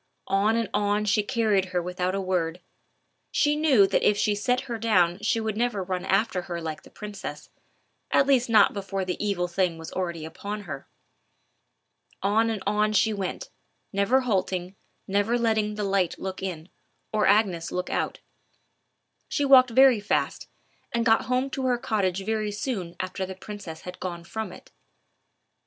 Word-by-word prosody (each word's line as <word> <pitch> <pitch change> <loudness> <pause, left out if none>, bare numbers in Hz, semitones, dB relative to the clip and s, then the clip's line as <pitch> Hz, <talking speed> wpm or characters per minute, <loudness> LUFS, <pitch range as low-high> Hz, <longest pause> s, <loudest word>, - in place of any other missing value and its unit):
On 205 +3 +3
and 230 -2 0
on 205 0 +1
she 210 +1 +3
carried 210 -4 +1
her 185 -1 -1
without 180 +1 -2
a - - -1
word. 180 -3 -1 0.7
She 295 0 +2
knew 290 -9 +5
that - - +1
if 205 - +3
she 210 - +2
set 250 +5 0
her 240 -4 -5
down 180 -5 +3
she 215 +2 +1
would 220 -2 -2
never 230 -3 0
run 185 -1 -3
after 195 -1 +1
her 175 -1 -5
like 160 -2 -5
the - - -16
princess, 200 -8 -8 0.6
at 275 - +4
least 260 -3 +3
not 215 -3 +6
before 195 -1 -3
the 180 +2 -3
evil 195 -4 0
thing 175 -1 0
was 160 0 -8
already 170 -4 -3
upon 205 +6 -6
her. 140 -8 -7 1.4
On 220 +3 +3
and 215 -4 -3
on 210 +1 +1
she 215 +2 +3
went, 200 - -4 0.4
never 200 +7 +3
halting, 190 -5 -1 0.3
never 205 +4 +1
letting 220 -3 +1
the 210 - -3
light 195 -3 +1
look 190 -1 -5
in, 180 -3 -5 0.4
or 215 -1 +2
Agnes 190 -6 +2
look 180 0 -3
out. - - -2 1.1
She 290 - 0
walked 260 -2 +7
very 255 -1 +6
fast, 205 - -1 0.4
and 235 -1 0
got 225 -1 +4
home 255 +2 0
to 265 -1 -2
her 245 -1 +2
cottage 195 -5 -1
very 215 -1 -1
soon 205 -6 -4
after 185 +1 -3
the 190 0 -5
princess 190 -5 -8
had 180 0 -9
gone 175 -2 -5
from 215 +2 -5
it. - - -14
205 Hz, 170 wpm, -26 LUFS, 185-225 Hz, 1.4 s, walked